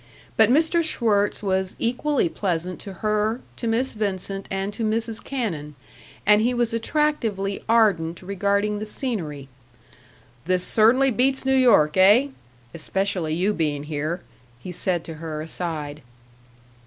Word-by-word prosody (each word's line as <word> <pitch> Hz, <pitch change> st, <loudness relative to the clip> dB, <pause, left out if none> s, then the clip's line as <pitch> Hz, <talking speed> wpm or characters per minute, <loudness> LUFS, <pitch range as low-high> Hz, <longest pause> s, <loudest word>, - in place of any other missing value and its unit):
But -, -, +5 dB
Mr. 320 Hz, +5 st, +3 dB
Schwirtz 215 Hz, -10 st, +1 dB
was 190 Hz, -1 st, -1 dB
equally 255 Hz, +1 st, 0 dB
pleasant 180 Hz, 0 st, -3 dB
to 200 Hz, -, -8 dB
her, 215 Hz, +2 st, +1 dB, 0.2 s
to 235 Hz, -, -4 dB
Miss 235 Hz, +4 st, 0 dB
Vincent, 195 Hz, -2 st, -3 dB
and 195 Hz, +1 st, -3 dB
to 225 Hz, -, -4 dB
Mrs. 225 Hz, 0 st, -2 dB
Cannon; 165 Hz, -, -4 dB, 0.5 s
and 210 Hz, +1 st, +5 dB
he 245 Hz, +2 st, +1 dB
was 240 Hz, -1 st, 0 dB
attractively 230 Hz, -6 st, -1 dB
ardent 190 Hz, -8 st, +2 dB
regarding 200 Hz, +2 st, 0 dB
the 215 Hz, -, -4 dB
scenery. 170 Hz, -, -3 dB, 1.0 s
"This 180 Hz, 0 st, +2 dB
cer'nly 255 Hz, +5 st, +4 dB
beats 265 Hz, +2 st, +1 dB
New 265 Hz, -, +2 dB
York, 200 Hz, -12 st, +4 dB
eh? 210 Hz, +9 st, +6 dB, 0.4 s
Especially 180 Hz, -1 st, -2 dB
you 190 Hz, +5 st, +1 dB
being 150 Hz, -5 st, -1 dB
here," 155 Hz, +3 st, -3 dB, 0.4 s
he 180 Hz, -, -8 dB
said 175 Hz, -1 st, -1 dB
to 165 Hz, -, -7 dB
her, 155 Hz, -2 st, -5 dB
aside. 155 Hz, -2 st, -5 dB
200 Hz, 135 wpm, -23 LUFS, 175-230 Hz, 1.0 s, eh